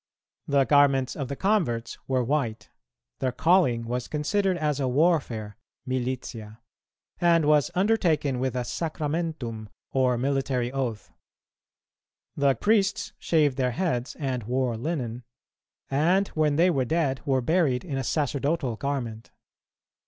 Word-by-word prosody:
The 140 -1 +3
garments 140 -3 +3
of 140 -3 -4
the 140 - -4
converts 140 - 0
were 130 -2 +1
white; 120 -4 -2 0.5
their 130 - 0
calling 130 -5 +3
was 125 +1 -3
considered 185 +5 0
as 150 -3 -1
a 135 - 0
warfare 125 -8 +1 0.3
(militia), 125 -4 -4 0.6
and 170 -2 +4
was 150 -1 +4
undertaken 175 - +1
with 130 0 -1
a 125 - -1
sacramentum, 150 -8 -3 0.2
or 130 -2 +2
military 130 -1 0
oath. 125 -6 -3 1.2
The 140 -2 +3
priests 205 -1 +1
shaved 150 -5 +2
their 125 -2 0
heads 150 -9 -1
and 130 -4 -2
wore 125 0 0
linen, 125 -3 -3 0.7
and 175 +8 +2
when 155 -2 +1
they 175 +4 +4
were 135 -5 +1
dead 140 -3 0
were 135 -2 +2
buried 155 -1 +1
in 140 -6 -3
a - - -2
sacerdotal 140 -1 -1
garment. 120 -5 -4
135 Hz, 130 wpm, -26 LUFS, 125-160 Hz, 1.2 s, and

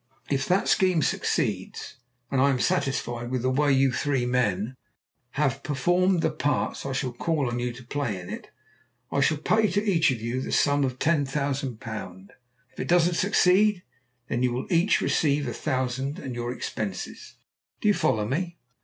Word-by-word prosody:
If 135 -1 0
that 185 +2 +2
scheme 185 -5 +3
succeeds, - - -2 0.3
and 135 - +2
I 140 - +5
am 130 -2 +1
satisfied 120 -2 -1
with 125 -1 -2
the 130 - +2
way 145 +2 +2
you 135 0 +4
three 135 -1 0
men 120 -2 0 0.6
have 140 -2 0
performed 175 +6 +1
the - - +2
parts 145 -1 -1
I - - -3
shall 130 -2 -2
call 150 +1 0
on 120 0 -2
you 120 0 -1
to 120 +1 -11
play 120 -6 -3
in 90 - -9
it, - - -7 0.6
I 140 - +1
shall 155 +2 +3
pay 215 +8 +2
to 205 +2 0
each 185 -6 +3
of 130 -4 -1
you 120 +3 -2
the - - -5
sum 145 0 +3
of 130 -1 -1
£10,000. 135 - -2 0.4
If - - -15
it 130 - -3
doesn't 175 0 +4
succeed, 195 +1 +3 0.4
then 120 - -1
you 125 -1 +2
will 125 +2 -3
each 170 +5 +3
receive 145 -2 +1
a 120 - -3
thousand 130 0 -2
and 130 - -6
your 120 0 -3
expenses. 105 -5 -5 0.4
Do - - -1
you 205 - +6
follow 105 - +1
me?" 170 - -2
135 Hz, 180 wpm, -26 LUFS, 125-160 Hz, 0.6 s, you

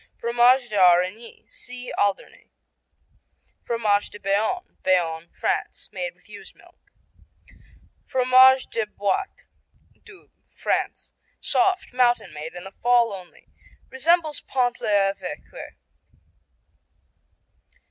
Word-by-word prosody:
Fromage 245 +2 +3
d'Aurigny 185 +2 +2
see 250 0 -9
Alderney. 200 -1 -2 1.1
Fromage 215 -3 0
de 205 - -12
Bayonne 210 - -2
Bayonne, 170 -3 0
France - - -2
Made - - -5
with - - -27
ewe's - - -13
milk. - - -22 1.3
Fromage 260 0 +5
de 225 -2 -2
Bôite 210 - -3 0.6
Doubs, 420 -4 -18 0.2
France - - -3 0.3
Soft, 370 -6 0
mountain 245 -8 +1
made, 155 +3 -8
in 175 - -8
the 195 - -10
fall 240 0 +2
only. 185 -2 -12 0.4
Resembles 310 +3 +1
Pont 245 -2 -1
l'Evêque. 200 - -2
235 Hz, 95 wpm, -23 LUFS, 195-260 Hz, 1.3 s, Fromage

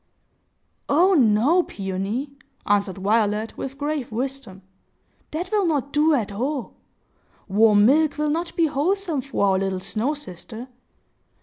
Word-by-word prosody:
"Oh 355 +7 +4
no, 260 - +4
Peony!" 200 - -4 0.3
answered 200 -1 +1
Violet, 210 +2 0
with 270 0 -6
grave 290 -4 -3
wisdom. 245 -5 -5 0.7
"That 350 +4 -4
will 410 -4 +2
not 285 -4 -1
do 300 +1 +4
at 215 -6 -2
all. 260 +5 -3 0.7
Warm 210 +1 +5
milk 300 +5 +3
will 300 0 0
not 335 +2 -3
be 335 - +3
wholesome 320 +2 0
for 270 -6 -1
our 190 -1 +2
little 190 -1 -2
snow 230 +10 -2
sister. 235 -1 -9
265 Hz, 130 wpm, -23 LUFS, 210-300 Hz, 0.7 s, Warm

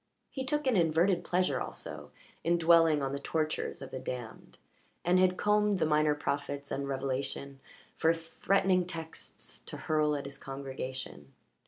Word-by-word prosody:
He 265 - -3
took 295 +2 0
an 260 -3 +3
inverted 170 +1 +3
pleasure 180 +1 +1
also 75 -1 -6 0.3
in 170 +1 +3
dwelling 165 -3 +5
on 135 - -1
the 140 - -3
tortures 155 -1 -2
of 135 - -9
the 130 - -4
damned, 120 -3 -7 0.5
and 180 +1 +4
had 185 0 +4
combed 210 -1 +3
the 160 - +2
minor 150 -1 +3
prophets 145 -1 -3
and 140 0 -2
Revelation 135 0 -3 0.4
for 160 - +4
threatening 180 +2 +1
texts 165 -2 -7
to - - -6
hurl 155 -1 +1
at 140 - -4
his 140 0 -8
congregation. 130 - -6
155 Hz, 155 wpm, -31 LUFS, 140-175 Hz, 0.5 s, dwelling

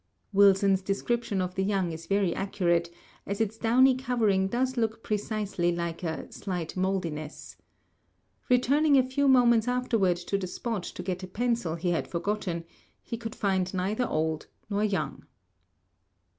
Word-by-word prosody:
Wilson's 195 -1 +5
description 200 +1 -1
of 180 0 -4
the 190 - -1
young 190 -3 0
is 165 +1 -8
very 195 -2 +2
accurate, 175 -3 0 0.4
as 200 0 -3
its 220 -1 0
downy 250 +4 +4
covering 230 -7 +1
does 255 +5 0
look 225 -2 -1
precisely 205 -4 -1
like 170 -1 -3
a 160 -3 -4
"slight 180 -5 -4
moldiness." 175 -5 -3 0.9
Returning 280 +4 +4
a 260 - +5
few 280 +2 +1
moments 240 -3 +5
afterward 230 -8 +1
to 180 +3 -2
the 185 - -3
spot 225 +2 -3
to 180 - -7
get 185 0 -3
a 185 - -6
pencil 230 -4 -1
he 175 +1 -1
had 170 - -1
forgotten, 175 -1 -2 0.4
he 235 - -4
could 225 -1 -6
find 190 -2 0
neither 210 +7 0
old 155 0 -1 0.2
nor 205 +1 +1
young. 195 -7 -2
195 Hz, 150 wpm, -28 LUFS, 180-230 Hz, 0.9 s, Wilson's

